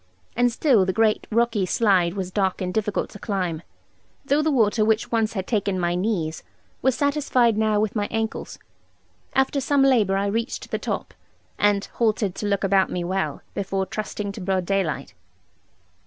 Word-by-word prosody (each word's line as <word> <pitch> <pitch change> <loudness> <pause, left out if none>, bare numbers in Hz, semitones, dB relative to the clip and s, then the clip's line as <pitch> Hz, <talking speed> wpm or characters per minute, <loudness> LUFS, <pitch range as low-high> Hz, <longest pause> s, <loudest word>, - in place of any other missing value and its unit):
And 245 +1 +3
still 235 -4 +3
the 185 0 0
great 220 0 +2
rocky 230 -2 +1
slide 185 -3 +2
was 185 -2 -4
dark 190 -1 0
and 180 -1 -3
difficult 210 -2 -1
to 205 - -11
climb; 180 -7 -2 0.6
though 285 +2 +2
the 310 - +1
water, 225 -5 +3
which 220 0 +1
once 225 -2 +1
had 190 -3 -3
taken 200 -4 0
my 175 -1 0
knees, 180 -4 -1 0.4
was 260 0 +2
satisfied 285 -5 +2
now 215 -1 +2
with 215 0 -1
my 205 -1 0
ankles. 225 -1 -3 0.8
After 270 +1 +2
some 275 +1 +2
labour, 220 -8 +3
I 200 - 0
reached 225 +4 -3
the - - -1
top; - - -4 0.5
and 205 -1 +2
halted 215 -4 0
to 210 - -4
look 200 -1 0
about 195 -1 +3
me 180 - -3
well, 190 +2 -2
before 195 -1 -2
trusting 210 0 -4
to 200 - -8
broad 185 -1 0
daylight. 175 -8 -1
205 Hz, 170 wpm, -23 LUFS, 190-230 Hz, 0.8 s, And